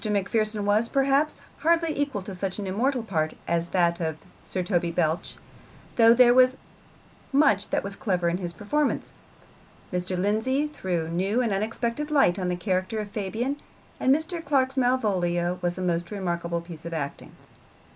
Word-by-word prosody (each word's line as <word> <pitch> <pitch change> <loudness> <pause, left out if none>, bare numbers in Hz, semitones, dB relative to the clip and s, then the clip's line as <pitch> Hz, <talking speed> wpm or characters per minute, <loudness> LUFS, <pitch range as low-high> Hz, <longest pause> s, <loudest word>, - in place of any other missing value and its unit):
Macpherson 210 +1 0
was, 215 +3 +2
perhaps, 275 +2 +1 0.2
hardly 330 -1 +2
equal 280 -9 -1
to 195 0 -7
such 185 0 -2
an 205 - -4
immortal 240 +6 0
part 160 -7 -1
as 170 0 0
that 170 -1 +1
of 160 -2 -2 0.3
Sir 185 - -2
Toby 175 -2 0
Belch, 165 0 -1 0.6
though 230 -1 +7
there 240 0 +7
was 255 +1 +5 0.7
much 270 -9 +3
that - - 0
was 200 0 -4
clever 180 -5 0
in 170 +1 +1
his 175 -2 -4
performance. 275 - -1 0.8
Mr. 180 +1 -2
Lindsay 220 +9 +1
threw 180 - -3
new 190 +7 0
and 235 -5 +1
unexpected 230 +7 -2
light 270 -12 +3
on 180 -1 -1
the 180 - 0
character 185 +3 -1
of 210 -1 -4
Fabian, 220 +7 -2 0.4
and 260 - +3
Mr. 325 +4 0
Clark's 270 -3 +1
Malvolio 185 -9 +1
was 175 0 -1
a 185 - -3
most 170 -1 0
remarkable 170 -4 -2
piece 170 -2 -10
of 170 0 -5
acting. 140 -3 -5
200 Hz, 165 wpm, -26 LUFS, 175-255 Hz, 0.8 s, though